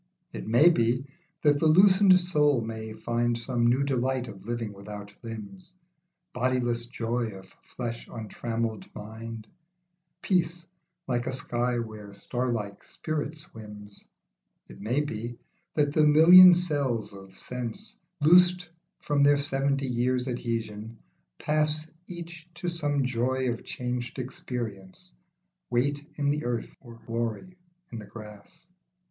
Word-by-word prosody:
It - - -7
may 120 +10 +6
be, 125 -4 +1 0.4
that 145 -1 +4
the 160 - +3
loosened 190 +3 +6
soul 150 -7 +2
may 110 -1 -5
find 120 +1 -1
Some 120 0 0
new 125 +3 +3
delight 130 -2 0
of 95 0 -11
living 115 -3 -3
without 105 +1 -9
limbs, 120 - -9 0.6
Bodiless 120 -1 0
joy 120 0 -2
of 95 0 -15
flesh 120 -2 -6
untrammelled 115 0 -4
mind, 110 +1 -8 0.8
Peace 170 -2 0 0.4
like 120 -2 -1
a - - 0
sky 120 -1 -1
where 110 -3 -6
starlike 115 -2 -3
spirit 155 -1 -4
swims. 105 -8 -9 0.6
It - - -13
may 120 +8 +1
be, 120 -4 -5 0.4
that 145 -2 +2
the 155 - +4
million 175 +4 +9
cells 140 - -1
of 95 -1 -13
sense, 120 - -6 0.3
Loosed 180 +2 +5 0.3
from 145 -1 +1
their 145 0 +6
seventy 140 -1 0
years' 125 +1 0
adhesion, 115 -3 -4 0.4
pass 155 +1 0 0.2
Each 170 -1 -9
to 175 0 -3
some 145 -5 0
joy 130 +1 0
of 115 - -6
changed 125 0 -4
experience, 115 - -6 0.6
Weight 140 +4 0
in 145 -1 +1
the 150 +1 -1
earth 120 -1 -3
or 120 -3 -13
glory 115 - -3 0.4
in 115 - -6
the 105 - -10
grass. 105 +9 -12
125 Hz, 130 wpm, -27 LUFS, 115-150 Hz, 0.8 s, million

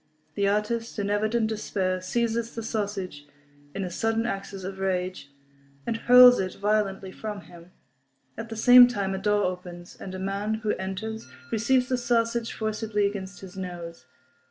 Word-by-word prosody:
The 200 -1 +1
artist, 220 +3 -1
in 205 -1 -1
evident 215 +2 +1
despair, 195 -4 -2
seizes 230 +3 -1
the 230 - -4
sausage, 200 -9 -4 0.5
in 195 - -2
a 180 - -4
sudden 225 +4 0
access 195 -3 -5
of 190 +1 -6
rage, 185 -5 -2 0.6
and 230 - -1
hurls 250 +2 +8
it 185 -1 -2
violently 200 -2 0
from 210 0 -6
him. 175 0 -15 0.6
At 225 +1 -7
the 225 - -5
same 245 +2 +9
time 200 -5 -2
a 190 - -3
door 210 0 +2
opens, 180 -1 -5
and 190 -1 -8
a - - -4
man 200 +3 -2
who 210 - +2
enters 195 +3 -5 0.2
receives 250 +3 +2
the 255 -1 0
sausage 235 -1 0
forcibly 215 -1 -1
against 200 -1 -4
his 190 -1 -11
nose. 170 -7 -7
205 Hz, 160 wpm, -26 LUFS, 190-225 Hz, 0.6 s, same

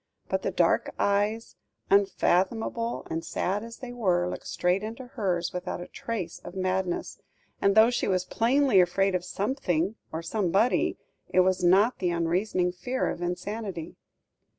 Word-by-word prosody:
But - - 0
the - - -1
dark - - +1
eyes, 205 +3 0 0.3
unfathomable 200 +4 +1
and 165 +1 -2
sad 190 +4 -2
as 230 0 -9
they 250 -2 -8
were, 180 -7 +1
looked - - -6
straight 180 +2 +1
into 225 +4 -6
hers 190 -8 -2
without 180 0 -4
a 175 - -7
trace 225 -7 -5
of 175 - -10
madness; 185 -1 -2 0.4
and 200 0 +3
though 220 +2 +7
she 240 - -1
was 185 -1 +1
plainly 245 -2 +3
afraid 195 +2 +2
of 180 -1 0
something 195 - -1 0.2
or 160 +1 -4
somebody, 200 +5 +1 0.3
it 185 - +4
was 185 0 +1
not 195 +7 +4
the 180 - +1
unreasoning 180 +2 0
fear 250 +8 -2
of - - -7
insanity. 180 0 -4
190 Hz, 150 wpm, -27 LUFS, 180-225 Hz, 0.4 s, though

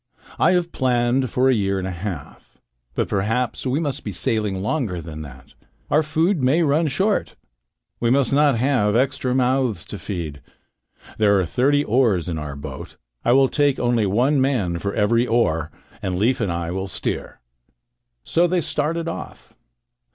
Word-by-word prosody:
I - - +4
have 175 -1 0
planned 125 0 +1
for 130 +3 +2
half 130 - +5
a - - +2
year. 95 - -3 0.6
But - - 0
perhaps 110 +6 -1
we 130 +4 0
must 145 -5 -2
be 105 - -4
sailing 100 +2 0
longer 105 - -2
than 80 -1 -8
that. 65 -3 -12 0.4
Our 150 - +4
food 160 +3 +1
may 140 +7 +3
run 155 +2 +2
short. 195 +9 0 0.6
We 120 - +1
must 135 +2 +2
not 145 -3 +4
have 115 -5 +2
extra 125 0 +1
mouths 130 -7 +1
to - - -8
feed. 80 -7 -5 0.8
There 100 -2 +4
are 95 - +1
thirty 140 - +2
oars 110 - +2
in 80 -3 -3
our 75 -2 -6
boat. 70 -2 -8 0.3
I 120 - +3
will 135 +1 +5
take 145 0 +1
only 120 -4 +1
one 130 +8 +2
man 105 -11 0
for 100 +2 -3
every 115 +3 +2
oar, 85 -9 +1 0.3
and 95 -1 -2
Leif 115 +6 +1
and 100 -5 0
I 85 0 -3
will 95 +1 -3
steer." - - -4 0.8
So 175 - +2
they 180 +1 +1
started 165 +3 -1
off. 165 - -7
120 Hz, 165 wpm, -22 LUFS, 95-140 Hz, 0.8 s, half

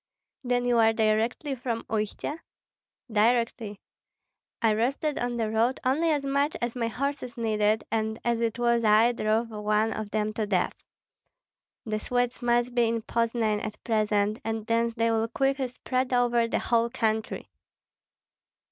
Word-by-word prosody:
"Then 245 -1 0
you 240 -1 +3
are 225 0 +5
directly 225 +6 0
from 235 -3 -3
Uistsie?" 215 +6 -3 0.8
"Directly. 225 -1 +1 0.8
I 225 -2 +3
rested 270 +7 -1
on 245 0 -2
the 220 -2 -1
road 230 +4 +1
only 300 +6 +2
as 290 -3 0
much 280 +2 0
as 240 0 -3
my 235 -2 -1
horses 255 +1 -3
needed, 215 -1 +1
and 220 0 -1
as 235 -1 +1
it 230 0 0
was 235 -1 +2
I 220 +2 +5
drove 225 0 0
one 215 +1 0
of 215 -1 -5
them 215 0 -1
to 215 -1 -2
death. 190 -3 +1 1.1
The 215 -1 -2
Swedes 245 +3 -1
must 240 0 +1
be 240 -1 +3
in 230 -1 -1
Poznan 225 -2 0
at 215 - -7
present, 215 -2 +1
and 225 -1 -3
thence 230 0 +1
they 230 0 +1
will 225 0 +1
quickly 270 +2 0
spread 255 +1 -2
over 240 -1 +3
the - - 0
whole 235 0 +1
country." 220 -3 -2
230 Hz, 155 wpm, -27 LUFS, 220-245 Hz, 1.1 s, are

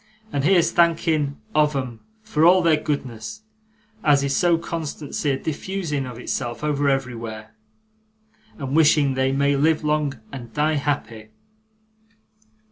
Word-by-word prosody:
And 140 - 0
here's 170 +1 +4
thanking 160 -4 +2
of 150 -1 +3
'em 125 -4 -4 0.2
for 160 -8 0
all 180 +2 +6
their 165 -2 +5
goodness 140 - -4 0.6
as 145 -4 +4
is 140 0 0
so 175 -2 +3
constancy 155 -3 -4
a 135 - +1
diffusing 160 -3 -3
of 125 -2 -8
itself 120 +1 -4
over 145 -1 +1
everywhere, 115 -5 -3 1.0
and 135 -1 -3
wishing 150 -3 +4
they 130 0 +1
may 140 +1 +2
live 155 +3 +2
long 150 -4 0
and 120 -4 -8
die 150 +1 +2
happy! 120 -7 -3
145 Hz, 130 wpm, -23 LUFS, 135-160 Hz, 1.0 s, all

